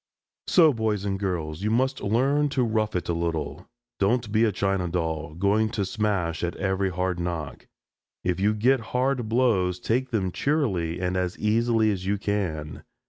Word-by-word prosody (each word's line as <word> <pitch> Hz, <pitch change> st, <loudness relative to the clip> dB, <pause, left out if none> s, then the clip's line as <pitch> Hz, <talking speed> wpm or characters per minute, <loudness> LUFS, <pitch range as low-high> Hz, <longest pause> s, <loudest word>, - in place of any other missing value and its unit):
So, 160 Hz, -5 st, +6 dB
boys 110 Hz, -3 st, -1 dB
and 95 Hz, -1 st, -1 dB
girls, 85 Hz, -5 st, -3 dB
you 105 Hz, -, 0 dB
must 130 Hz, +4 st, +1 dB
learn 135 Hz, +8 st, +2 dB
to 130 Hz, -, +4 dB
rough 110 Hz, -2 st, 0 dB
it 90 Hz, -, -2 dB
a 85 Hz, -, 0 dB
little. 85 Hz, -2 st, -3 dB, 0.3 s
Don't 110 Hz, +2 st, +1 dB
be 110 Hz, +2 st, +4 dB
a 110 Hz, -, +2 dB
china 95 Hz, -2 st, 0 dB
doll, 80 Hz, -3 st, -3 dB
going 100 Hz, +5 st, +2 dB
to 100 Hz, -, +1 dB
smash 95 Hz, -6 st, -1 dB
at 85 Hz, -, -2 dB
every 95 Hz, 0 st, 0 dB
hard 90 Hz, 0 st, -2 dB
knock. 85 Hz, -4 st, -4 dB, 0.6 s
If 90 Hz, 0 st, 0 dB
you 105 Hz, +2 st, +2 dB
get 125 Hz, +5 st, +3 dB, 0.2 s
hard 125 Hz, -3 st, 0 dB
blows 105 Hz, -7 st, +2 dB
take 125 Hz, +7 st, 0 dB
them 100 Hz, -7 st, -1 dB
cheerily 95 Hz, -, 0 dB
and 90 Hz, 0 st, -1 dB
as 90 Hz, -1 st, -1 dB
easily 110 Hz, 0 st, +2 dB
as 95 Hz, -2 st, -4 dB
you 100 Hz, +1 st, +1 dB
can. 90 Hz, -7 st, -3 dB
100 Hz, 175 wpm, -25 LUFS, 90-115 Hz, 0.6 s, So